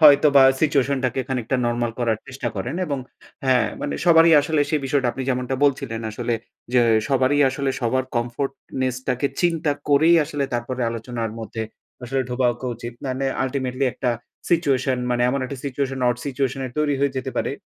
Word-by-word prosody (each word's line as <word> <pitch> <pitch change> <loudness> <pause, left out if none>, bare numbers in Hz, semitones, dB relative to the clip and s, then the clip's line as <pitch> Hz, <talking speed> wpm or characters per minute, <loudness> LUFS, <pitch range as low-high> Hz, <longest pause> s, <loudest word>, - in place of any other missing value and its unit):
হয়তোবা 145 -2 +7 0.2
সিচুয়েশন 140 -3 +2
টাকে 130 +1 0
খানিকটা 130 0 -1
নরমাল 120 0 -1
করার 115 -3 +1
চেষ্টা 130 -2 -4
করেন 95 +10 -3
এবং 140 -3 -2 0.5
হ্যাঁ 125 -3 +3
মানে - - -2
সবারই 165 -1 +6
আসলে 150 +1 0
সেই 155 - +1
বিষয়টা। 135 -1 +1
আপনি 135 - -5
যেমনটা 125 0 -1
বলছিলেন 125 -5 0
আসলে 120 +2 -2 0.4
যে 125 - +6 0.3
সবারই 135 +1 +2
আসলে 135 0 -1
সবার 130 +2 +1
comfortness 130 +1 -2
টাকে 125 +2 +1
চিন্তা 165 -4 +1 0.2
করেই 155 +4 +5
আসলে 145 -2 -2
তারপরে 120 +2 -3
আলোচনার 115 0 -4
মধ্যে 110 0 -5 0.4
আসলে 135 +2 -1
ঢোকা 125 0 +1
ক - - -15
উচিত। 120 +1 -7
মানে 130 +1 -2 0.2
আল্টিমেটলি 130 0 -1
একটা 125 -1 0 0.4
সিচুয়েশন 135 -6 +2
মানে 120 0 +1
এমন 135 +2 0
একটা 135 +2 -5
situation 135 0 -2
odd 120 -1 0
situation 135 -1 -1
এর 125 - -9
তৈরি 150 -1 +2
হয়ে 140 -1 +1
যেতে 130 0 -3
পারে। - - 0
130 Hz, 170 wpm, -22 LUFS, 125-140 Hz, 0.5 s, হয়তোবা